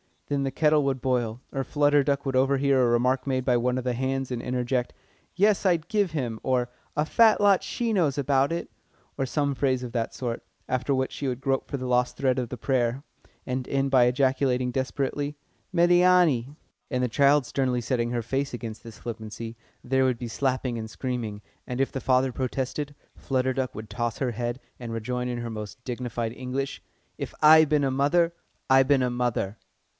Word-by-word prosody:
Then 140 -1 0
the 135 - 0
kettle 150 +1 +3
would 135 -2 -1
boil, 125 -3 -1
or 135 - -2
Flutter 145 +1 +3
Duck 140 0 0
would 135 -1 0
overhear 135 0 +3
a 125 - +4
remark 125 +3 +1
made 130 -1 0
by 125 -2 +3
one 125 +1 0
of 130 - -2
the 125 -1 0
"hands," 130 +1 -2
and 120 -2 -2
interject: 125 0 -1 0.4
"Yes, 205 +1 +3
I'd 170 -3 +2
give 205 -5 +1
him!" 120 -7 -2
or, 125 -2 0 0.3
"A 150 - +1
fat 220 +4 +4
lot 200 -2 +4
she 235 -1 -2
knows 160 -9 +2
about 140 +1 +2
it," 170 - -3 0.5
or 135 - 0
some 140 +1 0
phrase 130 -2 0
of 125 - -5
that 115 -2 -2
sort; 120 -2 -3 0.3
after 130 +2 0
which 130 0 -1
she 140 - -4
would 125 0 -3
grope 135 0 -1
for - - -3
the 130 -2 -4
lost 125 0 +1
thread 130 -2 +1
of 120 -2 -3
prayer, 130 0 0 0.4
and 125 0 -3
end 135 0 0
by 130 -2 +6
ejaculating 130 0 +1
desperately: 140 +3 -2 0.4
"Médiâni!" 175 -6 +4 0.3
And 125 -2 0
the 125 - +1
child 140 +2 +4
sternly 130 -2 0
setting 120 -1 -1
her 120 -1 -1
face 135 +4 -2
against 115 -2 -6
this 115 -2 -11
flippancy, 115 0 -7 0.3
there 130 +1 +2
would 130 -2 +1
be 120 0 -6
slapping 130 -1 -1
and 110 0 -6
screaming, 115 -4 -4 0.3
and 125 +1 -2
if 135 - 0
the 135 - -4
father 130 0 +2
protested, 135 +3 -3 0.2
Flutter 130 -1 0
Duck 130 -1 -2
would 110 0 -8
toss 120 -1 -2
her 130 -3 0
head, 120 +2 -3 0.2
and 120 -2 -6
rejoin 125 +2 -2
in 120 -1 -3
her 120 0 -4
most 110 +3 -7
dignified 120 -2 -3
English: 130 +2 -4 0.4
"If - - -6
I 155 +1 +8
bin 150 -1 +2
a 135 - +1
mother, 165 +6 +2 0.3
I 135 0 +6
bin 135 -1 +3
a 125 - +1
mother!" 120 -4 -1
130 Hz, 195 wpm, -26 LUFS, 125-140 Hz, 0.5 s, I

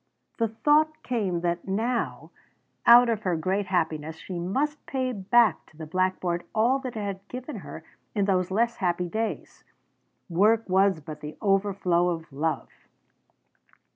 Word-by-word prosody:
The 230 - +2
thought 300 +8 +2
came 200 -8 -1
that 175 +1 -2
now, 230 +5 -2 0.6
out 240 +1 +9
of 225 -3 0
her 185 -4 0
great 190 +5 -1
happiness, 160 -3 -1
she 175 +2 -7
must 280 - -1
pay 260 -1 -1
back 225 +3 +3
to 155 - -22
the 160 - -7
blackboard 185 0 -1
all 240 +5 +3
that 255 -4 -6
it - - -2
had 200 -1 -5
given 255 +2 -7
her 160 -4 -9 0.3
in 200 -2 +2
those 185 -2 +1
less 235 +4 +1
happy 180 -1 0
days. 220 +5 -4 0.6
Work 210 +6 +3
was 190 -2 +3
but 155 0 -9
the 150 +1 -8
overflow 195 -3 +2
of 165 -4 -5
love! 155 +4 -2
195 Hz, 150 wpm, -26 LUFS, 175-230 Hz, 0.6 s, out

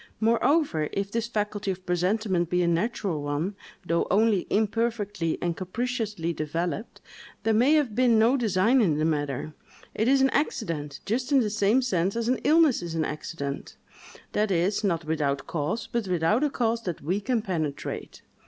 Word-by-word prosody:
Moreover, 230 - +2
if 200 0 -2
this 230 +1 -1
faculty 210 -3 -2
of 185 -1 -4
presentiment 180 0 0
be 180 0 +2
a - - +1
natural 170 -2 -1
one, 145 +7 -2 0.3
though 170 0 +1
only 205 -1 +2
imperfectly 210 -5 0
and 170 -1 0
capriciously 210 -3 -3
developed, 165 +8 -3 0.4
there 225 0 +2
may 250 +7 +4
have 285 -8 +1
been 240 0 +4
no 230 +4 +4
design 225 +1 +3
in 165 -9 +2
the 155 - +1
matter: 145 -1 -2 0.4
it 220 - 0
is 270 +1 +5
an 270 0 +3
accident, 165 - -2
just 250 +6 -1
in 275 -2 +5
the 210 -3 -1
same 215 +4 +2
sense 190 -4 0
as 235 0 -1
an 255 +1 +1
illness 310 -4 +4
is 170 -1 -5
an 160 -1 0
accident; 150 -2 -5 0.5
that 210 0 +1
is, 190 +4 +1
not 170 -5 0
without 145 -3 -1
cause, 165 +8 -2
but 235 -4 -3
without 180 - +2
a 300 - +2
cause 230 -3 0
that 175 -9 -5
we 185 +7 -1
can 230 0 0
penetrate. 160 -7 -4
200 Hz, 170 wpm, -26 LUFS, 165-230 Hz, 0.5 s, is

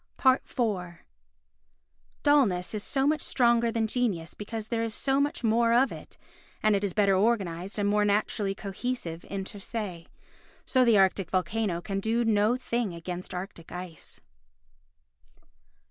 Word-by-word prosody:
iv 260 0 +6 1.8
Dullness 230 -13 +3
is 210 -1 -3
so 270 -1 0
much 305 +1 +2
stronger 235 -2 +3
than 225 -1 0
genius 215 -8 -1
because 215 +1 -6
there 230 -1 0
is 225 -1 -2
so 270 0 +1
much 290 -2 -1
more 230 +1 +3
of 255 +3 +4
it, - - -10 0.5
and 215 -1 +4
it 200 - -1
is 195 -3 -1
better 200 -2 +4
organised 195 -3 0
and 205 -1 +1
more 210 0 +3
naturally 205 -1 0
cohesive 195 -4 -4
inter 195 +1 -5
se. 195 -6 -5 0.6
So 255 -1 +3
the 230 -3 +5
arctic 190 -2 +2
volcano 185 0 -1
can 195 +1 -3
do 230 +3 0
no 220 +2 +3
thing 235 -7 -2
against 180 +2 -6
arctic 180 -2 -7
ice. 180 -2 -8
210 Hz, 145 wpm, -28 LUFS, 190-235 Hz, 1.8 s, iv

